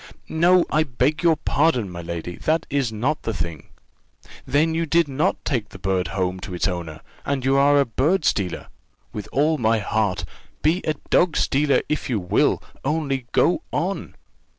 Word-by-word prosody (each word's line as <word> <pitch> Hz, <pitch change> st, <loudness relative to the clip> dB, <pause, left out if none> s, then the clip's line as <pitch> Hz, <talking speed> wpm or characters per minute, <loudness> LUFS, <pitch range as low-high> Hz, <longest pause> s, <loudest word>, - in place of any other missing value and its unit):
"No, 175 Hz, +2 st, +4 dB
I 155 Hz, -, +3 dB
beg 150 Hz, +2 st, 0 dB
your 170 Hz, -2 st, +4 dB
pardon, 145 Hz, -6 st, +1 dB
my 85 Hz, -1 st, -6 dB
lady, 85 Hz, +1 st, -5 dB
that 160 Hz, +1 st, 0 dB
is 135 Hz, -5 st, 0 dB
not 125 Hz, +8 st, -1 dB
the 115 Hz, -, -3 dB
thing." 85 Hz, -4 st, -5 dB, 0.8 s
"Then 155 Hz, +3 st, +2 dB
you 165 Hz, 0 st, -1 dB
did 165 Hz, +1 st, +3 dB
not 145 Hz, +7 st, -1 dB
take 120 Hz, -7 st, -1 dB
the -, -, -11 dB
bird 95 Hz, -1 st, -1 dB
home 95 Hz, -1 st, -2 dB
to 90 Hz, -, -6 dB
its 90 Hz, -, 0 dB
owner 85 Hz, -4 st, -5 dB, 0.2 s
and 140 Hz, -2 st, -2 dB
you 135 Hz, +1 st, +3 dB
are 145 Hz, +1 st, +5 dB
a 140 Hz, -, +3 dB
bird 150 Hz, -, +1 dB
stealer? 95 Hz, -4 st, -1 dB, 0.4 s
With 105 Hz, -, -6 dB
all 150 Hz, +3 st, +2 dB
my 115 Hz, -1 st, +3 dB
heart: 100 Hz, -5 st, -1 dB, 0.4 s
be 165 Hz, +5 st, +2 dB
a 155 Hz, -, 0 dB, 0.2 s
dog 175 Hz, -2 st, +3 dB
stealer, 140 Hz, +1 st, +2 dB
if 150 Hz, -, -2 dB
you 115 Hz, -4 st, 0 dB
will 90 Hz, -2 st, +1 dB, 0.2 s
only 135 Hz, -4 st, -1 dB
go 175 Hz, -, +3 dB
on." -, -, -3 dB
135 Hz, 175 wpm, -23 LUFS, 95-155 Hz, 0.8 s, are